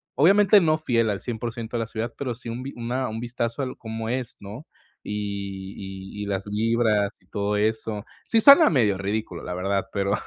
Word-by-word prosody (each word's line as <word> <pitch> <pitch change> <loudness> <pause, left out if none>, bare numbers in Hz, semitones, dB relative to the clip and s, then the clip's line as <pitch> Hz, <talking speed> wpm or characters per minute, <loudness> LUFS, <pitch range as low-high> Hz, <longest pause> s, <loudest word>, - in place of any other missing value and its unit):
obviamente 200 +5 +6
no 155 -2 +3
fiel 115 -7 +1
al 100 -2 -2
100% 115 0 -4
de - - -1
la 115 - -3
ciudad, 115 +1 -4
pero 125 -4 -3
sí 120 0 -9
un 120 +2 -4
vi 135 - -6
una 125 +1 -2
un 110 - -5
vistazo 120 +1 -3
a - - 0
l 130 - -5
cómo 110 0 -5
es, 125 -1 -3
¿no? 105 +9 -9 0.4
Y 100 -2 -4 0.5
y - - -2
y - - -4
las 95 -1 -2
vibras, 110 -1 +1
y 90 - -30
todo 100 +2 -1
eso. 110 0 -1 0.2
Sí 225 -1 +2
suena 280 +6 +9
medio 110 - +2
ridículo, 100 -2 -3
la 90 - -4
verdad, 95 +2 -1
pero, 100 0 0
115 Hz, 205 wpm, -25 LUFS, 100-125 Hz, 0.5 s, suena